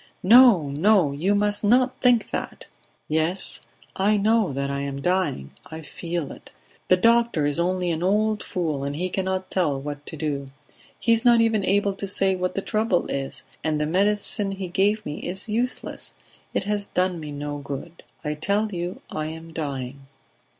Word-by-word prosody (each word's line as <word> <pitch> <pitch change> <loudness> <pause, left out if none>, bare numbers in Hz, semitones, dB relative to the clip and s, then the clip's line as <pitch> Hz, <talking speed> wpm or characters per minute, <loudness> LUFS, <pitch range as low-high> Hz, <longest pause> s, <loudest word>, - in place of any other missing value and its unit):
"No! 215 - +7
No! 170 +2 +3
You 175 +9 +1
must 205 +1 +1
not 250 +4 +3
think 245 -3 +3
that." - - -5 0.4
"Yes, 160 +4 -1 0.3
I 205 +2 +2
know 215 -2 +2
that 140 +1 -2
I 140 - -2
am 140 0 -4
dying. 175 - -1 0.2
I 160 0 -8
feel 170 0 -4
it. - - -12 0.4
The 185 - +5
doctor 230 -6 +3
is 145 +3 0
only 180 0 0
an 165 0 -2
old 210 +3 +1
fool, 155 -6 -2
and 140 +1 -3
he 180 +4 -2
cannot 190 0 -2
tell 155 -7 +1
what 145 +1 -6
to 160 - -6
do. 140 -2 -3 0.5
He 230 - +3
is 230 0 +4
not 240 -2 +6
even 225 -3 +2
able 200 +1 +2
to 195 +1 -5
say 190 0 +1
what 180 0 -2
the 195 - -2
trouble 215 -5 +1
is, 135 -1 -4 0.2
and 155 -1 0
the 150 - +1
medicine 200 +3 +1
he 190 -2 -5
gave 205 +4 +1
me 150 - -5
is 190 +5 -5
useless; 235 +4 -3 0.4
it - - -1
has 205 0 -2
done 180 -1 0
me 150 -2 -7
no 145 0 -5
good. 145 +4 -7 0.2
I 150 - 0
tell 200 +8 0
you 180 +9 -4
I 155 0 -3
am 160 +1 -8
dying." 135 -3 -5
180 Hz, 180 wpm, -24 LUFS, 150-205 Hz, 0.5 s, No